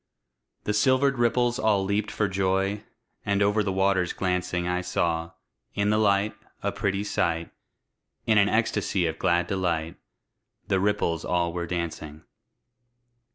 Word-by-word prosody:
The 105 - -1
silvered 130 +4 +3
ripples 120 +1 +2
all 105 -5 +2
leaped 100 +1 0
for 105 - 0
joy! 95 +2 0 0.4
And 100 -1 +1
over 105 +1 +2
the 100 -2 -1
waters 95 -2 +1
glancing 90 -1 -1
I 90 0 0
saw, 85 -2 -1 0.4
in 100 +1 +1
the 105 - +2
light, 100 0 +2 0.3
a - - 0
pretty 100 -1 -1
sight; 85 -5 -1 0.7
In 110 -2 +4
an 100 0 +4
ecstasy 105 -4 +1
of 80 -1 -3
glad 85 -1 +2
delight, 85 -3 -2 0.7
The 95 - +2
ripples 95 -5 0
all 85 -1 0
were 85 -1 -3
dancing. 80 -3 -5
95 Hz, 140 wpm, -26 LUFS, 85-105 Hz, 0.7 s, In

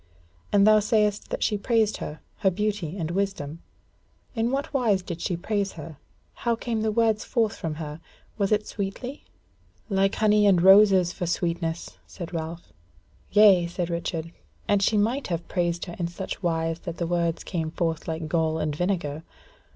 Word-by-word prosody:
And 200 -1 +5
thou 215 0 +7
sayest 210 -1 +1
that - - -2
she 210 -2 +1
praised 220 -1 +2
her, 150 +1 -7 0.2
her 195 - +3
beauty 200 -3 -2
and 165 -2 -3
wisdom. 175 -5 -2 0.7
In 230 -1 0
what 280 +4 -2
wise 220 -8 +2
did 175 -2 -6
she 175 - -1
praise 200 +2 -1
her? 160 -2 -9 0.4
how 235 -1 +1
came 230 -1 -2
the 220 0 +1
words 220 -1 +2
forth 225 -4 0
from 160 -2 -4
her? 150 0 -7 0.3
was 200 -1 0
it 210 0 +2
sweetly?" 225 +7 -5 0.6
"Like 195 -1 +2
honey 210 -1 +4
and 190 -3 +5
roses 190 -1 +6
for 175 - -4
sweetness," 170 -1 -2
said 175 -1 -8
Ralph. 165 +1 -6 0.6
"Yea," 200 -4 +6
said 175 0 -3
Richard, 165 -1 -3 0.4
"and 205 -1 +3
she 210 +2 +3
might 235 +7 +1
have 170 -1 -3
praised 175 -2 -1
her 175 -2 -8
in 170 - 0
such 175 +3 -6
wise 165 -2 -1
that 170 -1 -6
the 170 - -1
words 170 -1 0
had - - -11
came 165 -3 -1
forth 165 -1 -2
like 160 -1 -3
gall 160 -1 +1
and 155 -2 -1
vinegar. 170 -4 -1
185 Hz, 175 wpm, -26 LUFS, 165-210 Hz, 0.7 s, thou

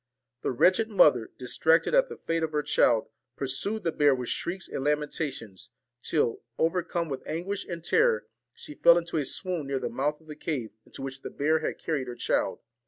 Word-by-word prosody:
The - - -1
wretched 185 - +3
mother, 150 - +4
distracted 160 - +2
at - - +4
the - - -8
fate 165 0 -2
of 160 -1 -2
her 150 0 +1
child, 120 -5 +3 0.3
pursued 170 +11 -2
the 165 - +1
bear 145 -3 +4
with 125 -2 -5
shrieks 190 +2 -3
and 135 - -4
lamenta 150 +1 0
tions, 105 -7 -9 0.3
till, 135 -7 0 0.2
overcome 170 0 0
with 135 -3 -4
anguish 185 +5 -3
and 170 -2 -6
terror, 475 - +3 0.3
she 300 - -10
fell 170 - +6
into 170 -1 -2
a 150 - +1
swoon 170 +1 -2
near 135 0 -1
the - - -3
mouth 150 +3 -1
of 160 - -22
the 155 -1 -9
cave 140 -7 -3 0.2
into - - -9
which 135 0 -6
the - - -6
bear 155 +3 +1
had 155 - -3
carried 145 -6 -2
her 120 - -6
child. 120 - 0
155 Hz, 200 wpm, -28 LUFS, 135-170 Hz, 0.3 s, fell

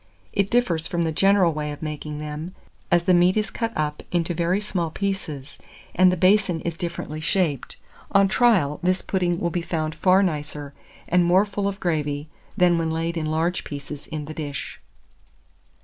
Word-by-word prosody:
It 200 0 +1
differs 180 -10 +1
from 170 -1 -1
the 160 - 0
general 195 0 +4
way 150 0 -3
of 145 - -8
making 150 -1 -5
them, 150 +4 -6 0.3
as 175 -1 +3
the 185 - +3
meat 180 +3 +4
is 215 -2 0
cut 230 -1 -2
up 150 -1 -1
into 175 0 0
very 170 +3 +1
small 185 -5 -2
pieces 155 -7 -4 0.3
and 185 +1 +5
the 180 - -1
basin 185 -1 +3
is 170 -1 -3
differently 170 -3 -5
shaped: 155 -5 0 0.3
on 195 0 +5
trial, 195 - +3
this 185 +1 +1
pudding 175 -3 0
will 170 - -1
be 175 - -1
found 160 -2 -2
far 185 +4 +4
nicer, 150 -4 -3 0.3
and 180 0 +3
more 180 +4 +4
full 200 -1 -2
of 200 0 -3
gravy, 150 -4 -1 0.3
than 175 -1 +4
when 165 -1 0
laid 165 +1 -2
in 160 -2 -2
large 165 +3 0
pieces 145 0 -7
in 155 -2 -5
the 155 - -7
dish. 145 -3 -6
170 Hz, 180 wpm, -24 LUFS, 155-185 Hz, 0.3 s, and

